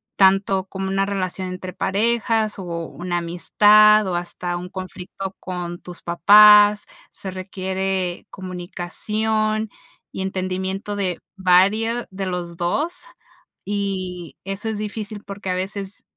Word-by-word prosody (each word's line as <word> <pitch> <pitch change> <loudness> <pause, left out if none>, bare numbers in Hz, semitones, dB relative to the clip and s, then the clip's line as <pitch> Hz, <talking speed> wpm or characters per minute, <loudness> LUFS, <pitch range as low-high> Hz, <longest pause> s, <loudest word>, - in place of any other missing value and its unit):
tanto 195 0 +3
como 190 0 -5
una 195 0 +1
relación 190 -1 -3
entre 185 0 -6
parejas, 220 +1 0
o - - -5 0.2
una 175 +1 -4
amistad, 210 +5 +5
o 185 - -2
hasta 175 0 -3
un 180 +1 -6
conflicto 185 +1 -7
con 175 -1 -5
tus 180 -1 -11
papás. 210 +3 +7 0.3
Se 190 - -7
requiere 190 -1 -3
comunicación 215 +4 -2 0.4
y 190 - -5
entendimiento 190 +1 -3
de 185 -4 -1 0.2
vario 200 +6 +3
de 190 0 -4
los 175 -2 -4
2 290 - -1 0.6
y 190 -4 -3
eso 195 +3 -4
es 220 - -3
difícil 210 0 -5
porque 200 -1 -7
a - - +1
veces 195 +1 -5
190 Hz, 120 wpm, -22 LUFS, 185-210 Hz, 0.6 s, papás